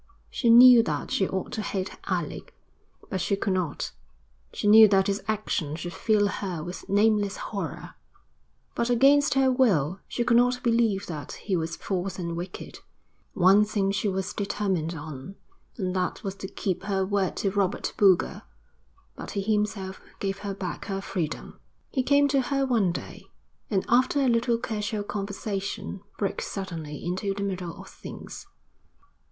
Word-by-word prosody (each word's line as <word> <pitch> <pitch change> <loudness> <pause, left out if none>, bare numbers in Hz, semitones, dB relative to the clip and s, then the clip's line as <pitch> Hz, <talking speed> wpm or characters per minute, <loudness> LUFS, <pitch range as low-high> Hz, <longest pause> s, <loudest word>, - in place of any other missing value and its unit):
She 235 - +1
knew 245 +1 +9
that 150 -8 -3
she 190 - +1
ought 190 -1 -3
to 225 - -3
hate 195 -2 -3
Alec, - - -3 0.6
but 190 - -1
she 200 - +1
could 200 -1 0
not. 180 -6 -2 0.6
She - - -5
knew 220 +1 +9
that 195 -1 +3
his 200 0 -1
action 200 -8 -1
should 175 +2 -6
fill 210 -2 +2
her 185 -5 -4
with 175 +2 -8
nameless 205 0 +2
horror, 200 -2 -5 0.8
but 235 - -1
against 280 +4 +4
her 265 -1 +4
will 195 - +2
she 240 - -1
could 235 0 +4
not 250 +1 +2
believe 230 -5 +2
that 155 -4 -6
he 195 - -3
was 165 -1 -2
false 190 -1 -3
and 170 -2 -3
wicked. 180 +2 -7 0.6
One 195 +3 +6
thing 205 -2 0
she 200 +1 -1
was 190 0 -2
determined 190 -5 -1
on, 150 +3 -8 0.4
and 185 -4 -2
that 180 -1 -2
was 195 -2 -3
to 195 - -6
keep 190 -1 -3
her 195 -1 0
word 195 -1 0
to 195 - 0
Robert 200 -1 -1
Boulger; 195 -3 +3 0.7
but - - -8
he - - +1
himself 205 -2 -2 0.2
gave 195 0 -2
her 200 -1 -4
back 185 -2 -5
her 195 -1 -3
freedom. 175 -5 -4 0.3
He 265 - +1
came 285 +2 +4
to 275 -1 +3
her 275 +1 0
one 225 -8 +2
day, - - -8 0.4
and 195 -3 0
after 255 +4 +3
a 270 - +3
little 235 0 +2
casual 215 -2 -3
conversation 200 -1 -4 0.2
broke 200 - -2
suddenly 165 -7 -6
into 190 +3 -2
the 200 - -3
middle 185 -4 -4
of - - -10
things. - - -10
200 Hz, 165 wpm, -26 LUFS, 185-220 Hz, 0.8 s, knew